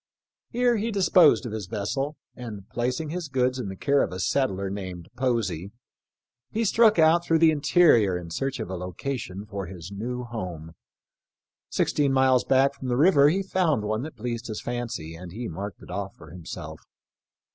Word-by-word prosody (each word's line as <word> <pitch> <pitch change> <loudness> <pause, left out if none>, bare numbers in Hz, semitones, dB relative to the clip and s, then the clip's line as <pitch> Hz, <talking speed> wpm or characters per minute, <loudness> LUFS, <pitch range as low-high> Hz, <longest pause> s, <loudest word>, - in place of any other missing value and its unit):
Here 245 -1 +2
he 220 +3 -1
disposed 185 - +5
of 120 - -4
his 105 -4 -5
vessel, 135 +9 -2 0.2
and 105 -6 -8
placing 125 +6 -2
his 175 -1 -4
goods 130 -1 0
in 115 - -4
the 95 - -6
care 140 +8 +2
of - - -1
a 90 - -5
settler 100 -3 0
named 95 -3 -6
Posey, 110 -9 -1 0.8
he 225 +1 -1
struck 220 +1 +5
out 165 +1 +5
through 165 -1 +2
the 160 0 +6
interior 140 - +4
in 85 -2 -8
search 135 +6 -2
of 110 -5 -4
a - - -3
location 95 +3 -5
for 100 -3 -5
his 90 0 -9
new 125 +5 -4
home. 90 -9 -6 1.0
Sixteen 140 -2 +1
miles 130 -1 +4
back 135 +1 +3
from 130 - -8
the 120 -1 0
river 145 -2 +6
he 190 +5 0
found 175 - +1
one 110 +2 -1
that 150 -1 -7
pleased 120 +1 -4
his 110 -2 -4
fancy, 120 -10 -4
and 85 +1 -10
he 120 +3 -5
marked 95 +3 -6
it - - -11
off 100 +1 -4
for 75 - -14
himself. 85 -1 -8
120 Hz, 180 wpm, -26 LUFS, 95-145 Hz, 1.0 s, the